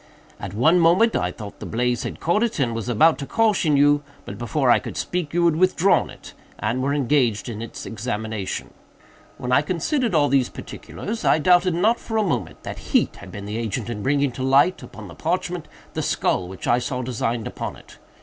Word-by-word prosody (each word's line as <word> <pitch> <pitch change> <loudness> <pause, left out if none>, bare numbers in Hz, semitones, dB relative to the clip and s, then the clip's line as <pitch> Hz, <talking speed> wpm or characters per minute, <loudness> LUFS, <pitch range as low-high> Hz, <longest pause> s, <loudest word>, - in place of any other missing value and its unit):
At 100 -1 -6
one 160 +10 +4
moment 180 +8 +4
I 90 - 0
thought 105 +1 -10
the - - -7
blaze 120 +1 0
had - - -5
caught 175 +6 +1
it, 235 -1 0
and 125 -5 0
was 115 +1 -4
about 155 +8 +4
to 140 - -5
caution 205 -10 +2
you, 145 +1 +4 0.2
but, 100 - -8
before 125 +2 +1
I - - +5
could - - -7
speak, 175 -4 -2
you 175 0 +2
had 170 -2 +4
withdrawn 185 +1 +3
it, - - -12 0.2
and 115 +4 -1
were 140 +2 0
engaged 130 -6 +1
in 110 -2 -5
its 115 - -7
examination. 110 -3 -4 0.6
When 125 - -4
I 135 +3 +5
considered 195 - -1
all 145 -2 +4
these 135 -3 +2
particulars, 225 +2 -7
I - - +4
doubted 175 +2 +4
not 220 +7 +2
for 225 - -4
a 215 - +3
moment 185 - -3
that - - -6
heat - - +2
had - - -11
been 100 -1 -7
the 105 +2 -4
agent 115 +1 -3
in 105 -3 -5
bringing 140 +2 +1
to 125 - -8
light, 140 +7 +3
upon - - -10
the - - -11
parchment, - - -2 0.3
the - - -2
skull 90 - 0
which 95 0 -8
I 120 - +3
saw 125 +1 -3
designed 120 -2 -2
upon - - -5
it. - - -17
135 Hz, 210 wpm, -23 LUFS, 115-170 Hz, 0.6 s, I